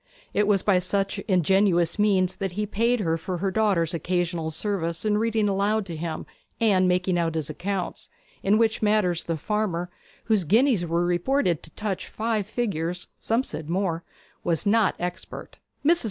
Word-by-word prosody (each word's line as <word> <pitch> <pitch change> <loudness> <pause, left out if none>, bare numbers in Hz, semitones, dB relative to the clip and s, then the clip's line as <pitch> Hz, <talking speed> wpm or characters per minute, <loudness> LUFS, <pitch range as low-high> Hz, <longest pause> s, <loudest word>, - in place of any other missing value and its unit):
It 210 0 +2
was 200 -3 +3
by 195 -3 +4
such 195 +2 -1
ingenuous 185 -1 +3
means 190 -3 +2
that 195 -2 -3
he 210 +3 -1
paid 230 +3 +1
her 165 -3 0
for 180 +2 -4
her 195 +2 -1
daughter's 190 -6 +1
occasional 170 -1 -1
services 170 +1 -2
in 210 0 +2
reading 225 -1 +1
aloud 200 +2 +1
to 170 -3 -6
him 160 0 -4 0.3
and 195 -5 +4
making 180 0 +1
out 165 -1 0
his 155 -2 -2
accounts, 185 +4 -4 0.3
in 200 +2 +3
which 225 -1 +2
matters 210 -5 +2
the 165 -1 -2
farmer, 180 -2 -2 0.3
whose 215 -4 +2
guineas 215 - +3
were 170 +1 +1
reported 175 - +1
to - - -10
touch 205 -3 -3
five 220 -2 -1
figures 180 -7 -2
some 230 +3 +1
said 155 - -7
more 175 -2 -1 0.4
was 170 +2 +1
not 210 0 +3
expert. 180 +1 -6 0.3
Mrs. 340 +3 +5
190 Hz, 170 wpm, -25 LUFS, 170-210 Hz, 0.4 s, Mrs